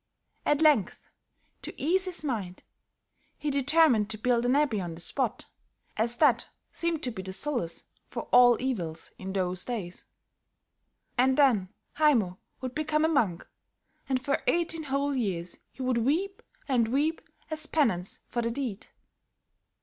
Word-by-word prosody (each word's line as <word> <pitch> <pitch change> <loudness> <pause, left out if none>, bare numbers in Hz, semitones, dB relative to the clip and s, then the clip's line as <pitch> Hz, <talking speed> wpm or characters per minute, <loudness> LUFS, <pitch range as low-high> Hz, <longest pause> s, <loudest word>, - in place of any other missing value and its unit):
At 295 +1 +3
length, 295 - +4 0.6
to - - -8
ease 370 +6 +2
his 360 -3 -2
mind, 210 -10 -4 0.7
he 300 - -2
determined 280 -6 +4
to 215 - -4
build 240 +2 +1
an 255 - +3
abbey 280 -9 +2
on 170 -2 -5
the - - -11
spot, 240 +8 -2 0.5
as 230 +2 +1
that 260 -7 +3 0.2
seemed 335 -2 -2
to 250 - -1
be 215 - -6
the 190 0 -7
solace 240 - -2 0.2
for - - -5
all 245 -1 +7
evils, 180 -12 -3
in 190 0 -5
those 185 -2 -1
days. 205 -8 -5 1.1
And 260 +1 +4
then 235 -10 +4 0.3
Haymo 230 -12 +3 0.2
would 255 -1 -4
become 305 +1 +1
a - - +4
monk, 220 - 0 0.6
and 260 -1 +2
for 275 +2 -1
eighteen 330 -2 0
whole 280 +1 0
years 185 -9 -3
he 265 - -7
would 255 -2 +1
weep 345 - 0 0.3
and 245 -5 +2
weep 290 +7 0 0.3
as 315 0 -1
penance 220 - 0
for 240 - -2
the 230 - -1
deed. 235 -5 -4
250 Hz, 150 wpm, -28 LUFS, 210-295 Hz, 1.1 s, all